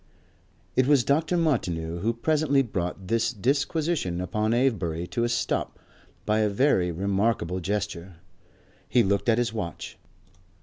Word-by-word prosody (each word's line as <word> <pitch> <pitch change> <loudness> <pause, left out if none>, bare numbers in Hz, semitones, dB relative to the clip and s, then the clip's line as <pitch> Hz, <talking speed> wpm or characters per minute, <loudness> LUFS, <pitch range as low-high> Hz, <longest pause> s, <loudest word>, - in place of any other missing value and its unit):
It 130 0 +3
was 140 -4 +4
Dr. 160 +6 +1
Martineau 85 - -1
who 110 +6 +1
presently 140 +3 +1
brought 95 -4 -4
this 115 +3 +1
disquisition 140 - -1
upon 105 +4 -1
Avebury 100 -10 0
to 115 +6 -2
a 120 - +1
stop 115 - -1 0.5
by 105 +1 +2
a 105 -1 +2
very 100 -5 +2
remarkable 95 0 0
gesture. 95 -1 -3 0.7
He 120 - +4
looked 100 +2 +1
at 115 - +4
his 120 -2 0
watch. 85 -7 -6
110 Hz, 135 wpm, -26 LUFS, 90-130 Hz, 0.7 s, was